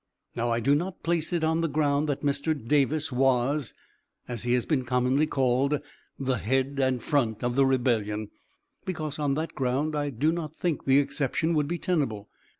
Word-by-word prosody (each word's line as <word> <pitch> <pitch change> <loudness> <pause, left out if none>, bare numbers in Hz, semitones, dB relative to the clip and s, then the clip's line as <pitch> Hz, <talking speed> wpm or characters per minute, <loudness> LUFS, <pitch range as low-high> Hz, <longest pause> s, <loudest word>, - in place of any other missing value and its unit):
Now, 120 +1 -1
I 115 0 +1
do 135 +5 +3
not 175 +5 -2
place 165 -1 0
it 170 -2 0
on 160 +1 +2
the 165 - 0
ground 145 0 +1
that 145 - -2
Mr. 145 +2 0
Davis 145 +4 +1
was, 135 +2 +1 0.5
as 120 -3 -4
he 120 0 0
has 125 -1 +1
been 145 -5 +1
commonly 125 +4 +2
called, 135 +2 +1 0.4
the 130 -2 -1
head 135 +4 0
and 130 -3 +1
front 115 -7 0
of 120 0 0
the 135 0 +4
rebellion, 110 -5 0 0.5
because, 155 -4 -4
on 145 -2 +1
that 160 +2 -3
ground, 135 +4 -1
I 145 -1 -1
do 140 +5 +1
not 160 -2 -4
think 170 -4 -2
the 135 0 +5
exception 145 +4 0
would 150 -2 +1
be 175 +3 -2
tenable. 135 - -1
140 Hz, 185 wpm, -27 LUFS, 125-155 Hz, 0.5 s, the